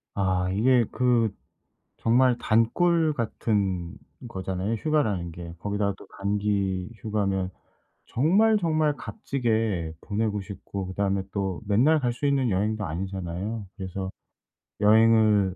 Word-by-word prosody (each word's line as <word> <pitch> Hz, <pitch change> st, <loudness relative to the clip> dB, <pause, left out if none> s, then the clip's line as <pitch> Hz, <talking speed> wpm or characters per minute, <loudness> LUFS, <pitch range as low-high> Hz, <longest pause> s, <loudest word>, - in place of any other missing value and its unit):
아 95 Hz, -2 st, +1 dB
이게 120 Hz, +4 st, +3 dB
그 120 Hz, -3 st, +2 dB, 0.7 s
정말 125 Hz, +1 st, +3 dB
단꿀 155 Hz, +10 st, +2 dB
같은 100 Hz, -7 st, -1 dB, 0.3 s
거잖아요 95 Hz, 0 st, -3 dB
휴가라는 105 Hz, -, 0 dB
게. 85 Hz, 0 st, -8 dB
거기다가 100 Hz, 0 st, -1 dB
또 -, -, -14 dB
단기 100 Hz, -2 st, 0 dB
휴가면 100 Hz, -4 st, -1 dB, 0.6 s
정말, 200 Hz, -, +3 dB
정말 155 Hz, -4 st, +1 dB
값지게 110 Hz, -, -2 dB
보내고 105 Hz, -1 st, -1 dB
싶고 100 Hz, -1 st, -6 dB
그다음에 95 Hz, +1 st, -1 dB
또 95 Hz, -2 st, -2 dB
맨날 130 Hz, +10 st, +4 dB
갈 125 Hz, -3 st, 0 dB
수 120 Hz, -, -4 dB
있는 135 Hz, -3 st, +2 dB
여행도 105 Hz, +3 st, 0 dB
아니잖아요. 95 Hz, +4 st, -4 dB
그래서 95 Hz, 0 st, -4 dB, 0.7 s
여행을 110 Hz, -3 st, +5 dB
105 Hz, 255 characters per minute, -26 LUFS, 95-120 Hz, 0.7 s, 여행을